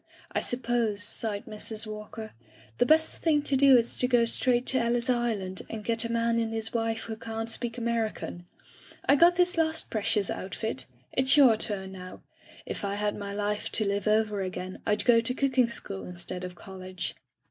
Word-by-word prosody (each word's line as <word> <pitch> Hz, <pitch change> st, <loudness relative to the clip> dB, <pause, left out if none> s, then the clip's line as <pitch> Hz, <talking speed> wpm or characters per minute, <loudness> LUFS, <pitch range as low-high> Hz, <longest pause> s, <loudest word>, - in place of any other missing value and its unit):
"I -, -, 0 dB
suppose," 235 Hz, -4 st, 0 dB
sighed 205 Hz, -1 st, -1 dB
Mrs. 215 Hz, +1 st, -5 dB
Walker, 215 Hz, +1 st, -7 dB, 0.5 s
"the -, -, +4 dB
best 315 Hz, +1 st, +4 dB
thing 300 Hz, -3 st, +2 dB
to 280 Hz, -, +1 dB
do 270 Hz, -1 st, +7 dB
is 235 Hz, 0 st, +1 dB
to 250 Hz, -, +3 dB
go 245 Hz, -2 st, +4 dB
straight 245 Hz, +1 st, +1 dB
to 260 Hz, -, +2 dB
Ellis 235 Hz, +2 st, +1 dB
Island 215 Hz, -6 st, -1 dB
and 220 Hz, -1 st, -6 dB
get 230 Hz, 0 st, 0 dB
a 230 Hz, -, -3 dB
man 230 Hz, 0 st, +1 dB
and 225 Hz, -1 st, -1 dB
his 225 Hz, 0 st, -2 dB
wife 225 Hz, -1 st, -1 dB
who 220 Hz, -, -5 dB
can't 225 Hz, 0 st, -5 dB
speak 235 Hz, +1 st, -4 dB
American. 225 Hz, -6 st, -3 dB, 0.6 s
I -, -, +7 dB
got 340 Hz, +4 st, +6 dB
this 360 Hz, -1 st, +2 dB
last 320 Hz, 0 st, 0 dB
precious 215 Hz, -2 st, +1 dB
outfit. 185 Hz, -, -4 dB, 0.3 s
It's 265 Hz, +3 st, +4 dB
your 260 Hz, -6 st, +7 dB
turn 200 Hz, -3 st, -3 dB
now. 185 Hz, -1 st, -10 dB, 0.4 s
If -, -, -5 dB
I 200 Hz, 0 st, -1 dB
had 210 Hz, 0 st, -1 dB
my 200 Hz, -1 st, -5 dB
life 205 Hz, +1 st, -2 dB
to 215 Hz, -, +1 dB
live 200 Hz, 0 st, -1 dB
over 215 Hz, -1 st, +2 dB
again 185 Hz, 0 st, -5 dB
Fd 210 Hz, 0 st, +1 dB
go 240 Hz, -2 st, +6 dB
to 245 Hz, +2 st, -1 dB
cooking 260 Hz, -3 st, +2 dB
school 195 Hz, -4 st, -5 dB
instead 180 Hz, +1 st, -3 dB
of 180 Hz, 0 st, -6 dB
college. 185 Hz, 0 st, -6 dB
225 Hz, 190 wpm, -28 LUFS, 205-240 Hz, 0.6 s, do